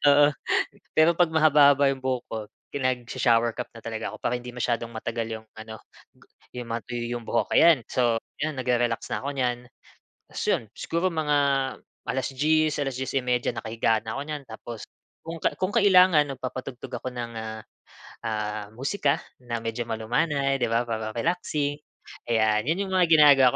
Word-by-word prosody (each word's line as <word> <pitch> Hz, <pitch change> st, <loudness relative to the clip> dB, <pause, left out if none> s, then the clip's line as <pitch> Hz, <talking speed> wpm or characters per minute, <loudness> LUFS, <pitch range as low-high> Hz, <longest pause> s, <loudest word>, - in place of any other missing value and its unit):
Oo. 145 Hz, +1 st, +6 dB, 0.7 s
Pero 160 Hz, +2 st, +6 dB
pag 175 Hz, -, +6 dB
mahaba-haba 145 Hz, -3 st, +5 dB
yung 135 Hz, -, -4 dB
buhok 130 Hz, -2 st, -1 dB
ko, 110 Hz, -, -2 dB, 0.3 s
pinagsha-shower 120 Hz, -3 st, +1 dB
cap 125 Hz, -, -4 dB
na 115 Hz, -, -10 dB
talaga 110 Hz, -1 st, -4 dB
ako, -, -, -8 dB
para 125 Hz, -, +1 dB
hindi 125 Hz, 0 st, -8 dB
masyadong 120 Hz, -1 st, -1 dB
matagal 115 Hz, 0 st, -3 dB
yung 110 Hz, -, -27 dB
ano, 110 Hz, 0 st, -8 dB, 0.4 s
gu -, -, -22 dB, 0.4 s
yung 120 Hz, -, -6 dB
matuyo 120 Hz, +1 st, -3 dB
yung 115 Hz, -, -13 dB
buhok. -, -, 0 dB
Ayan, 160 Hz, -8 st, +6 dB
so, 120 Hz, -3 st, +1 dB, 0.2 s
yan 155 Hz, 0 st, -1 dB
nagre-relax 120 Hz, -2 st, 0 dB
na -, -, -2 dB
ako 140 Hz, -, -2 dB
niyan. 125 Hz, -2 st, 0 dB, 0.7 s
Tapos -, -, -5 dB
'yon -, -, +2 dB
siguro 170 Hz, +3 st, 0 dB
mga 150 Hz, -2 st, +1 dB, 0.7 s
alas-dies, 150 Hz, +4 st, +1 dB
alas-dies 135 Hz, -1 st, -3 dB
y -, -, +4 dB
media, 125 Hz, -1 st, +1 dB
nakahiga 115 Hz, -1 st, 0 dB
na 110 Hz, -, -4 dB
'ko 140 Hz, -, -3 dB
niyan. 150 Hz, -1 st, -5 dB
Tapos, 115 Hz, 0 st, -8 dB, 0.4 s
kung 165 Hz, +1 st, -6 dB
ka -, -, +2 dB
kung 185 Hz, +2 st, -1 dB
kailangan, 185 Hz, -8 st, +6 dB
nagpapatugtog 130 Hz, -1 st, -6 dB
ako 130 Hz, -, -4 dB
ng 120 Hz, -1 st, -5 dB
ah 110 Hz, 0 st, -5 dB, 0.7 s
ah, 105 Hz, -1 st, -3 dB
musika 140 Hz, -, 0 dB, 0.2 s
na 120 Hz, -1 st, -3 dB
medyo 115 Hz, +1 st, -2 dB
malumanay, 135 Hz, +5 st, 0 dB
'di 120 Hz, -, +1 dB
ba, 115 Hz, +1 st, +2 dB
para 110 Hz, -1 st, -3 dB
relaxing. 145 Hz, 0 st, -1 dB, 0.5 s
Ayan, 110 Hz, -1 st, +3 dB
'yun 190 Hz, +5 st, 0 dB
yung 190 Hz, -, -5 dB
mga 180 Hz, -2 st, +4 dB
ginagawa 145 Hz, -5 st, +7 dB
125 Hz, 165 wpm, -26 LUFS, 115-150 Hz, 0.7 s, ginagawa